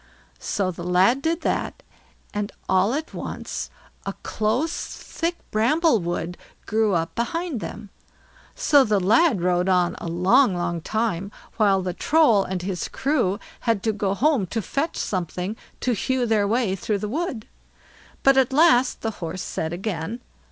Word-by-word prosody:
So 190 -2 -1
the 170 0 -8
lad 185 +9 +3
did 330 +3 0
that, - - -2 0.5
and 210 -1 -2 0.2
all 190 +6 +3
at 310 +2 -4
once - - -5 0.3
a - - -4
close, 230 +9 0 0.2
thick 340 +1 -3
bramble 250 +5 +3
wood 175 0 -3 0.3
grew 215 -3 +2
up 165 +1 -1
behind 330 +3 -2
them. 210 -1 -7 0.6
So 285 -3 +5
the 210 -4 +2
lad 220 - +3
rode 180 +1 +2
on 180 -2 +3
a - - -6
long, 185 +7 +4
long 175 -1 -2
time, 205 -1 -1 0.3
while 200 -4 +3
the 180 -1 -2
Troll 260 - +4
and 185 -1 -4
his 185 -1 -3
crew 250 -9 0 0.3
had 215 -3 +1
to 220 - +1
go 200 -1 -1
home 270 -6 +2
to 225 - -2
fetch 280 - -2
something 180 +2 -3 0.3
to 250 - +1
hew 255 +3 0
their 215 -3 +2
way 220 -3 +1
through 205 +2 -1
the 210 - -4
wood. 260 -3 -3 0.8
But 270 0 +5
at 265 -1 +4
last, 265 -4 +4
the 225 - -1
Horse 170 +2 -4
said 160 - -3
again. 190 +3 -4
215 Hz, 160 wpm, -24 LUFS, 185-260 Hz, 0.8 s, So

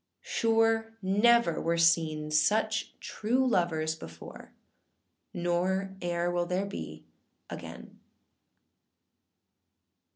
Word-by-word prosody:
Sure 225 0 +1
never 205 -1 +3
were 170 +1 0
seen 160 -2 +2
such 215 +8 +1
true 245 +5 -1
lovers 165 -8 +1
before, 80 - -11 0.8
Nor 185 +2 -1
eâer 175 0 -1
will 175 0 0
there 185 +2 -1
be 200 - -8 0.5
again. - - -9
180 Hz, 85 wpm, -29 LUFS, 170-220 Hz, 0.8 s, never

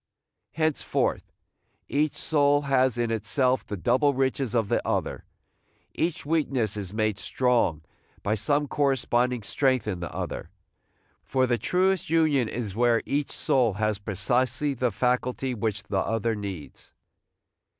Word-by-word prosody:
Henceforth 155 -1 -1 0.6
each 150 0 0
soul 145 -1 +2
has 130 -3 +2
in 120 -1 0
itself 125 +4 +1
the 105 - -6
double 130 +8 +2
riches 130 -2 0
of 115 -3 +2
the - - +1
other. - - -2 0.7
Each 165 -3 -2
weakness 140 -9 0
is 100 -3 -4
made 110 -1 -1
strong 115 - +1 0.4
by 105 - +1
some 145 +8 +1
corresponding 125 -4 +1
strength 130 0 +1
in 95 -4 -2
the 85 - -5
other; - - -5 0.7
for 130 -1 +1
the 120 -2 0
truest 185 - +1
union 155 -7 +3
is 110 -5 -4
where 120 0 +3
each 145 0 -1
soul 120 -6 +1
has 105 +1 -1
precisely 120 +8 0
the 125 -2 0
faculty 125 +3 0
which 105 -2 -2
the 100 -2 -1
other 115 +3 0
needs. 100 -7 -7
125 Hz, 135 wpm, -26 LUFS, 110-140 Hz, 0.7 s, union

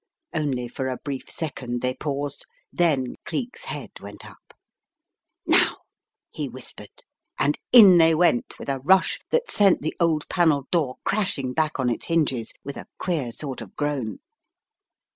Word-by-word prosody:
Only 140 -6 -1
for 130 +2 -4
a 130 -1 -3
brief 140 -2 -6
second 125 -6 -4
they 125 0 0
paused, 145 +1 -4 0.3
then 145 -8 +1
Cleek's 250 -2 -5
head - - -6
went - - -10
up. - - -17 0.9
"Now," - - +4 0.5
he - - -4
whispered, - - -10 0.3
and - - +1
in 200 -8 +9
they 165 0 +5
went, 160 -7 +2
with - - -9
a 135 -1 -1
rush 185 +8 +3
that 485 0 0
sent 195 -7 +4
the 155 - -2
old 160 -3 +1
panelled 155 -6 +1
door 150 -7 +1
crashing 185 -11 0
back 155 -1 0
on 130 - +1
its 120 - -2
hinges 140 -9 0
with 140 - -7
a - - -9
queer 155 -10 -2
sort 135 +1 -5
of 110 - -11
groan. 145 -7 -2
145 Hz, 155 wpm, -24 LUFS, 130-170 Hz, 0.9 s, in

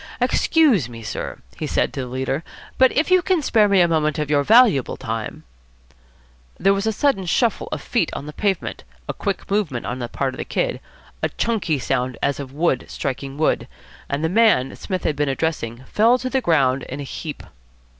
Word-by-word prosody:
"Excuse 260 - +3
me, 115 -1 -9
sir," - - -5 0.2
he - - -2
said - - 0
to - - -5
the 130 - -3
leader, 130 +4 -2 0.4
"but 260 -1 +6
if 315 +5 +1
you 370 0 +6
can 360 -4 +1
spare 220 -5 +4
me 195 -2 +5
a 175 - +5
moment 155 -2 +1
of 150 -1 -2
your 145 -1 +4
valuable 220 - +5
time 110 -1 -5 0.6
" - - -32
There 195 +2 +4
was 200 +2 -1
a - - +3
sudden 215 -5 +1
shuffle 230 +5 +1
of - - -4
feet 230 -10 0
on 140 - -5
the 150 - -8
pavement, 195 +1 -2 0.2
a - - -2
quick 200 -1 -4
movement 185 - 0
on 125 - -4
the 120 - -3
part 130 +2 -2
of - - -10
the - - -1
Kid, - - -1 0.4
a - - 0
chunky 210 -10 0
sound 125 -1 -1
as 140 0 +1
of 135 -2 -6
wood 145 -3 0
striking 135 +1 -4
wood, 155 - +1 0.4
and 140 +2 -2
the - - +3
man 200 - +3
Psmith 185 -3 -4
had 150 - 0
been 145 0 0
addressing 135 -5 -2
fell 230 - +3
to 255 0 -4
the 265 - +1
ground 135 - +2
in 140 - -7
a - - -4
heap. 150 +2 -6
155 Hz, 205 wpm, -21 LUFS, 130-210 Hz, 0.6 s, but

